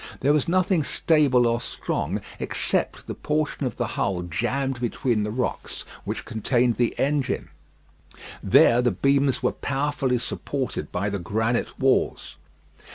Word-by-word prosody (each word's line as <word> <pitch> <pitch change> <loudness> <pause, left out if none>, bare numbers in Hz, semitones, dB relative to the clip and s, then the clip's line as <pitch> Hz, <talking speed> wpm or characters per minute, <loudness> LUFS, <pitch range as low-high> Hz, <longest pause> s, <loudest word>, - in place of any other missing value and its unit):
There 140 +3 +4
was 150 -3 +1
nothing 185 -1 +2
stable 140 -5 +3
or 115 0 +1
strong 90 +8 -3 0.2
except - - -1
the - - -5
portion 150 -2 -1
of - - -6
the 120 - 0
hull 95 -4 -1
jammed 125 +9 -2
between 120 -1 0
the 105 - -1
rocks 125 +4 -3 0.2
which - - -4
contained 120 +1 +1
the 120 -1 +1
engine. 140 -2 0 0.9
There 120 +1 +5
the 125 - +3
beams 140 0 +1
were 125 - +3
powerfully 140 -2 -1
supported 130 +2 -4
by 100 +2 -1
the 100 - -2
granite 110 +6 -1
walls. 135 0 +1
125 Hz, 140 wpm, -24 LUFS, 115-140 Hz, 0.9 s, There